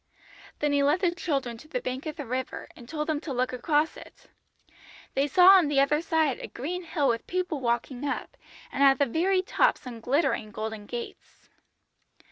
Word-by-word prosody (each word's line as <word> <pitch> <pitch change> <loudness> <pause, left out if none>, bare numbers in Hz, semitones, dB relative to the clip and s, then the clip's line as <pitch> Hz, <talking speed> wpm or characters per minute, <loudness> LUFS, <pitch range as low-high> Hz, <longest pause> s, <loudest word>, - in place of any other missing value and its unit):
"Then 295 -1 0
he 285 0 +3
led 290 +6 +2
the 360 -3 +3
children 275 -10 -2
to 310 - -14
the - - -2
bank 260 - -4
of 305 - -4
the 295 -4 -6
river, 255 +2 -4
and 240 0 -14
told 300 -1 -2
them 305 -2 -1
to 325 - -6
look 255 0 -1
across 295 +5 +1
it. - - -14 0.9
They 275 +2 +1
saw 360 +6 +7
on 375 -5 +7
the 285 -1 +2
other 295 +2 +3
side 320 -5 +1
a - - -6
green 345 +8 -5
hill 310 -4 0
with 230 -2 -1
people 360 -4 -2
walking 245 +1 -2
up, 285 - -3 0.4
and 275 - -3
at 270 -1 +6
the 285 - +3
very 370 +8 +1
top - - +2
some 245 -4 -9
glittering 250 -2 0
golden 215 0 -6
gates. 240 -1 -8
285 Hz, 195 wpm, -27 LUFS, 250-320 Hz, 0.9 s, saw